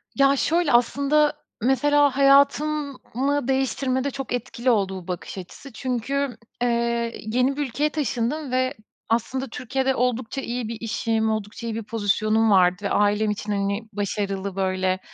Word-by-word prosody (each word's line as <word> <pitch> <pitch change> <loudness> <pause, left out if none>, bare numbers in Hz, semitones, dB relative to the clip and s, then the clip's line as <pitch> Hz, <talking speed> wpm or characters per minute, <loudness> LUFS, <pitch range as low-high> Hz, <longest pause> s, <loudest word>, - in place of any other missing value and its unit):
Ya, 275 0 +4
şöyle, 330 +2 +1
aslında 280 +5 +3 0.3
mesela 280 +2 +3
hayatımı 280 -1 +2
değiştirmede 265 0 0
çok 270 -1 -5
etkili 245 0 -2
oldu 195 -4 +1
bu - - -20
bakış 180 +1 -5
açısı 190 +9 -10
çünkü, 255 +1 -2 0.2
eee, 235 -1 0
yeni 250 +5 +1
bir 295 - -1
ülkeye 290 +5 0
taşındım 290 -1 -2
ve 255 +1 +1 0.4
aslında 255 +4 0
Türkiye'de 265 +2 -1
oldukça 250 +1 -1
iyi 240 -3 -3
bir 230 - -5
işim, 225 0 0
oldukça 215 +2 -4
iyi 225 - -3
bir 225 - -4
pozisyonum 215 +1 +1
vardı. 185 +1 +4
Ailem 210 +1 +2
için, 210 0 -4
hani, 200 +1 0
başarılı, 200 -1 -2
böyle, 185 -1 0
240 Hz, 140 wpm, -24 LUFS, 215-275 Hz, 0.4 s, Ya